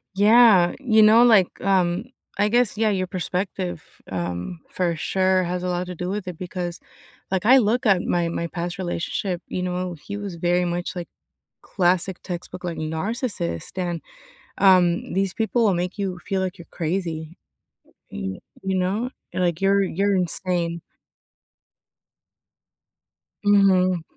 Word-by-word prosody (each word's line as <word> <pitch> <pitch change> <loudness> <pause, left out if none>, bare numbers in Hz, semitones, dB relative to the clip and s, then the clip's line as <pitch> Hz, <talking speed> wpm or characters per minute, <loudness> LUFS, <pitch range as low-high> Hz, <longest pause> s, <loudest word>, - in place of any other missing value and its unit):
Yeah, 205 -3 +6
you 225 -5 +4
know, 220 +2 +7
like, 215 -7 +6
um, 185 0 +1 0.3
I 205 +1 +3
guess, 240 -1 +2
yeah, 220 0 +2
your 185 -2 0
perspective, 180 -1 -3 0.3
um, 90 - -4
for 175 -2 -1
sure 185 +3 +1
has 180 +1 -3
a - - -2
lot 180 0 -2
to 180 - -6
do 180 +1 -4
with 200 -1 -4
it, 180 -3 -6
because, 180 -1 -5 0.5
like, 190 +1 0
I 260 +2 +8
look 240 +2 +2
at 190 -3 +4
my, 175 -1 0
my 170 - -3
past 175 +1 -4
relationship, 180 0 -3
you 180 - -3
know, 180 0 -3
he 205 +6 -7
was 200 -3 -6
very 175 +1 +1
much 175 +1 -3
like 175 -1 -5 0.5
classic 180 0 0
textbook, 180 0 -7
like, 175 -2 -4
narcissist, 160 - -3
and, 175 -3 -2 0.6
um, 180 -3 +4
these 195 0 0
people 225 +1 +1
will 200 - +4
make 180 +3 -2
you 190 -3 -3
feel 195 - -1
like 190 +1 -3
you're 170 - -12
crazy, 165 -1 -3 0.7
y 95 +8 -5 0.2
you 190 -1 -1
know, 200 +7 -1 0.2
like 175 -2 0
you're 195 +1 +3
you're 195 +2 0
insane. 175 -2 -1 2.6
Mhm. 185 -4 +4
185 Hz, 145 wpm, -23 LUFS, 175-195 Hz, 2.6 s, I